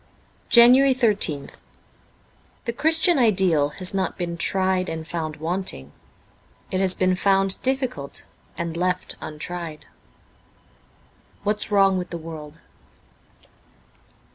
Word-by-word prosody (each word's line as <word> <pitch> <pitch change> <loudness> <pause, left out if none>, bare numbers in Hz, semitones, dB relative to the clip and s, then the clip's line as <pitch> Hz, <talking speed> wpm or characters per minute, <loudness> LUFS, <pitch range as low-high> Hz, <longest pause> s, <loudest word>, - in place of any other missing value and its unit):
13 - - -33 0.2
JANUARY 270 0 +4
13th 205 - 0 1.1
THE 235 - -3
Christian 320 +4 +4
ideal 185 - +2
has 185 0 +1
not 190 -2 -2
been 170 -1 -4
tried 185 +1 +1
and 160 0 -6
found 160 -3 -4
wanting. 160 - -3 0.8
It 185 - -1
has 190 -1 +3
been 185 0 +1
found 195 0 +1
difficult; 260 - -2 0.3
and 170 -1 -4
left 180 +1 -2
untried. 160 0 -6 0.8
' 60 - -34
What's 210 +1 0
Wrong 195 -2 +3
with 180 - -6
the 170 - -5
World.' 155 -2 -10
185 Hz, 115 wpm, -22 LUFS, 160-200 Hz, 1.1 s, JANUARY